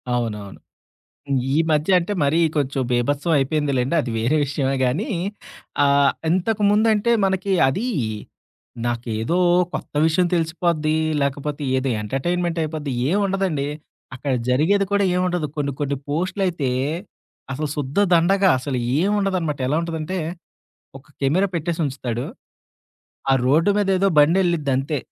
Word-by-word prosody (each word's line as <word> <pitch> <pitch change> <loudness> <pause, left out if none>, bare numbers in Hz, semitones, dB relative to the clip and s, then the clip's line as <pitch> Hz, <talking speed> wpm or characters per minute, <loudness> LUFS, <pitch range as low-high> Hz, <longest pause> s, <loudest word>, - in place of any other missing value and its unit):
అవునవును. 105 -5 -4 1.0
ఈ - - +2
మధ్య 150 +3 +1
అంటే 180 +4 -3
మరీ 145 +4 +2 0.2
కొంచెం 135 -2 0
బీభత్సం 140 +6 0
అయిపోయిందిలెండి. 140 -1 0
అది 125 - -4
వేరే 120 +8 +1
విషయమే 135 -1 -1
గానీ. 150 - -1 0.8
ఆహ్, 140 0 +4 0.2
ఇంతకుముందంటే 210 +3 +2
మనకి 190 +1 0 0.2
అది, 210 - -1 1.0
నాకేదో 120 +5 -1 0.4
కొత్త - - -5
విషయం 170 +3 +2
తెలిసిపోద్ది, 160 -2 0 0.3
లేకపోతే 145 +1 -2
ఏదో 130 +1 0
ఎంటర్టైన్మెంట్ 170 +9 -1
అయిపోద్ది 155 -3 -4 0.2
ఏమి 195 +6 +2
ఉండదండి. 190 -7 -1 0.5
అక్కడ 135 +1 -3 0.2
జరిగేది 160 +11 +3
కూడా 200 0 +3
ఏముండదు. 180 -3 0
కొన్ని 140 -1 -1
కొన్ని 140 -1 -1
పోస్టులయితే, 175 -2 -1 0.8
అసలు 150 +2 -3
శుద్ధ 145 +3 -3 0.2
దండగా 190 +4 +4
అసలు 130 0 -3 0.2
ఏం 190 +5 +2
ఉండదనమాట 180 -7 -1
ఎలా 150 - +1
ఉంటదంటే, 165 +2 -3 0.8
ఒక 135 - -21
కెమెరా 165 +9 +2
పెట్టేసి 170 0 -2
ఉంచుతాడు, 125 -3 -4 1.1
ఆ - - +5
రోడ్డు 160 +8 +4
మీద 205 -2 0
ఏదో 195 +1 +3
బండి 160 +6 +5
వెళ్ళిద్ది 165 -6 0
అంతే. 140 +3 -1
155 Hz, 125 wpm, -22 LUFS, 135-180 Hz, 1.1 s, ఆ